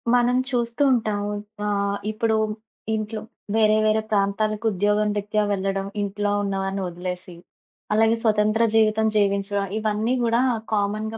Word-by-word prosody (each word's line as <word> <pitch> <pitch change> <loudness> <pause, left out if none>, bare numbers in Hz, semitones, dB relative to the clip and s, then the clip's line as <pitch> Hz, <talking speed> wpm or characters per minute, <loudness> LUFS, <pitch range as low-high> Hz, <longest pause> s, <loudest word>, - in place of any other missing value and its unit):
మనం 245 +1 +3
చూస్తూ 240 +1 0
ఉంటాం. 215 -4 0 0.4
ఆహ్, 200 -1 0
ఇప్పుడు 220 0 0 0.6
ఇంట్లో 215 0 -4 0.3
వేరే, 215 -1 +4
వేరే 215 0 +3
ప్రాంతాలకు 210 +2 0
ఉద్యోగం 210 +2 +1
రీత్యా 210 +1 0
వెళ్ళడం, 195 0 -1 0.2
ఇంట్లో 205 0 -1
ఉన్నవారిని 195 0 -2
వదిలేసి, 180 0 -6 0.6
అలాగే 225 +1 +4
స్వతంత్ర 215 0 +3
జీవితం 220 0 +3
జీవించడం 200 -1 +1
ఇవన్నీ 215 +2 0
కూడా 235 +1 +2 0.3
కామన్‌గా 215 +2 -1
210 Hz, 120 wpm, -23 LUFS, 200-220 Hz, 0.6 s, వేరే